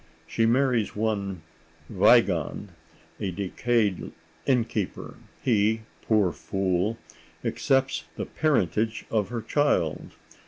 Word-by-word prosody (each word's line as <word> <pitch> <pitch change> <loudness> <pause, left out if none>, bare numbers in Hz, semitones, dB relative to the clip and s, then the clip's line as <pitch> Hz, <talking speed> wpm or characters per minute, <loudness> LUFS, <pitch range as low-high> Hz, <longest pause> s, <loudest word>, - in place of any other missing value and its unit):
She 115 +7 +1
marries 125 -2 +2
one 100 -5 -2 0.4
Wiegand, - - +3 0.5
a 100 - -2
decayed 100 +2 0 0.4
innkeeper; 115 -7 -1 0.3
he, 110 -2 +2 0.2
poor 105 -5 +2
fool, 95 +4 -1 0.5
accepts 135 0 +1
the - - -4
parentage 110 - 0
of 105 -3 +1
her 120 -2 -4
child. 145 - 0
110 Hz, 90 wpm, -26 LUFS, 100-120 Hz, 0.5 s, Wiegand